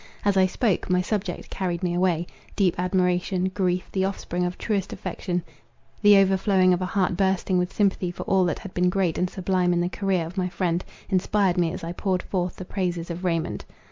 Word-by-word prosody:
As 200 Hz, -1 st, +3 dB
I 190 Hz, -1 st, +5 dB
spoke, 195 Hz, -1 st, 0 dB
my 180 Hz, 0 st, +3 dB
subject 190 Hz, -1 st, -3 dB
carried 180 Hz, -2 st, -2 dB
me 175 Hz, -1 st, 0 dB
away; 175 Hz, -2 st, +1 dB, 0.3 s
deep 185 Hz, -4 st, +3 dB
admiration; 180 Hz, 0 st, +1 dB
grief, 185 Hz, -2 st, 0 dB
the 190 Hz, -, 0 dB
offspring 185 Hz, -2 st, -2 dB
of 180 Hz, 0 st, -3 dB
truest 200 Hz, -4 st, -1 dB
affection, 180 Hz, -1 st, -3 dB, 0.6 s
the 205 Hz, -1 st, +7 dB
overflowing 190 Hz, -1 st, +4 dB
of 180 Hz, -, -1 dB
a 185 Hz, -, -1 dB
heart 185 Hz, -1 st, +1 dB
bursting 190 Hz, -1 st, +1 dB
with 180 Hz, +1 st, -1 dB
sympathy 195 Hz, -3 st, +1 dB
for 175 Hz, -, -6 dB
all 190 Hz, -1 st, +3 dB
that 175 Hz, -, 0 dB
had 195 Hz, -, -9 dB
been 180 Hz, 0 st, +2 dB
great 180 Hz, -3 st, 0 dB
and 180 Hz, -, +1 dB
sublime 180 Hz, -1 st, +1 dB
in 175 Hz, -, +1 dB
the 175 Hz, -, 0 dB
career 190 Hz, -3 st, 0 dB
of 170 Hz, +4 st, -9 dB
my 180 Hz, 0 st, 0 dB
friend, 175 Hz, -1 st, -1 dB, 0.3 s
inspired 190 Hz, -1 st, +2 dB
me 170 Hz, -2 st, +2 dB
as -, -, -7 dB
I 165 Hz, -, -3 dB
poured 185 Hz, +1 st, -1 dB
forth 180 Hz, -2 st, -2 dB
the 185 Hz, -, -8 dB
praises 175 Hz, -3 st, -2 dB
of 170 Hz, +2 st, -6 dB
Raymond. 165 Hz, -3 st, -1 dB
185 Hz, 205 wpm, -25 LUFS, 175-190 Hz, 0.6 s, the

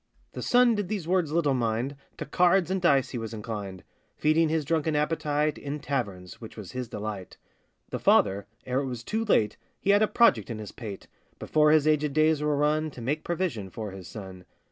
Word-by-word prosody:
The -, -, -7 dB
son 245 Hz, -1 st, +4 dB
these 205 Hz, -4 st, -3 dB
words 180 Hz, -3 st, +2 dB
did 155 Hz, -, -3 dB
little 150 Hz, -5 st, +2 dB
mind, 120 Hz, +2 st, -1 dB, 0.2 s
To -, -, -5 dB
cards 180 Hz, +2 st, +3 dB
and 190 Hz, -1 st, 0 dB
dice 140 Hz, -6 st, +3 dB
he 125 Hz, -, -3 dB
was 115 Hz, 0 st, -5 dB
inclined; 105 Hz, -4 st, -6 dB, 0.3 s
Feeding 155 Hz, +1 st, +3 dB
his 160 Hz, -1 st, 0 dB
drunken 160 Hz, 0 st, 0 dB
appetite 150 Hz, -1 st, 0 dB
In 145 Hz, +1 st, -5 dB
taverns, 100 Hz, -12 st, -4 dB
which 110 Hz, -, -10 dB
was 105 Hz, -4 st, -8 dB
his 125 Hz, -1 st, -4 dB
delight. 105 Hz, -4 st, -6 dB, 0.5 s
The -, -, -3 dB
father, 100 Hz, +1 st, +3 dB, 0.2 s
ere 130 Hz, +1 st, 0 dB
it 140 Hz, -, -2 dB
was 120 Hz, -3 st, -5 dB
too 220 Hz, -, -1 dB
late, 110 Hz, -, +2 dB, 0.2 s
He 200 Hz, -, +2 dB
had 205 Hz, +1 st, +5 dB
a 215 Hz, -, +4 dB
project 125 Hz, -, +3 dB
in 115 Hz, -, -4 dB
his 105 Hz, -1 st, -7 dB
pate, 105 Hz, -5 st, -8 dB, 0.3 s
Before 150 Hz, -1 st, +3 dB
his 155 Hz, -1 st, +5 dB
agèd 150 Hz, -2 st, +2 dB
days 155 Hz, 0 st, +3 dB
were 150 Hz, -1 st, +1 dB
run, 155 Hz, +2 st, +1 dB
To 130 Hz, -, -12 dB
make 145 Hz, +6 st, -2 dB
provision 170 Hz, -, -2 dB
for 105 Hz, +1 st, -6 dB
his 95 Hz, -2 st, -9 dB
son. 95 Hz, -1 st, -9 dB
145 Hz, 205 wpm, -27 LUFS, 110-160 Hz, 0.5 s, had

